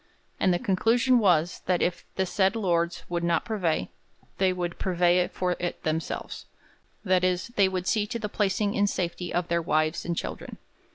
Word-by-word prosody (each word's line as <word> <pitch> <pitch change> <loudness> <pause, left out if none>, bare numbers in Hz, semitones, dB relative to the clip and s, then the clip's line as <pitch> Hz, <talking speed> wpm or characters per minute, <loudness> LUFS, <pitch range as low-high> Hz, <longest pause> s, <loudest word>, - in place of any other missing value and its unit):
'And 185 - +3
the 175 - +2
conclusion 230 +7 +3
was, 175 -5 +2
that 180 -2 +2
if 175 -1 -1
the 190 - +1
said 190 +3 +1
lord 170 -5 0
would 170 -1 -2
not 170 -1 +1
purvey, 175 - -1 0.5
they 190 -1 +3
would 175 -1 -4
purvey 180 -1 +2
for 180 -1 -2
it 175 0 -4
themselves. 160 +1 -3 0.6
That 185 -1 +3
is, 185 +3 0
they 200 -5 +3
would 185 -1 -3
see 210 +1 +1
to 235 - -3
the 215 -2 -3
placing 205 0 0
in 205 0 +2
safety 175 -2 -3
of 175 0 -1
their 170 0 +1
wives 155 0 0
and 170 -1 -3
children.' - - -5
180 Hz, 180 wpm, -27 LUFS, 170-195 Hz, 0.6 s, And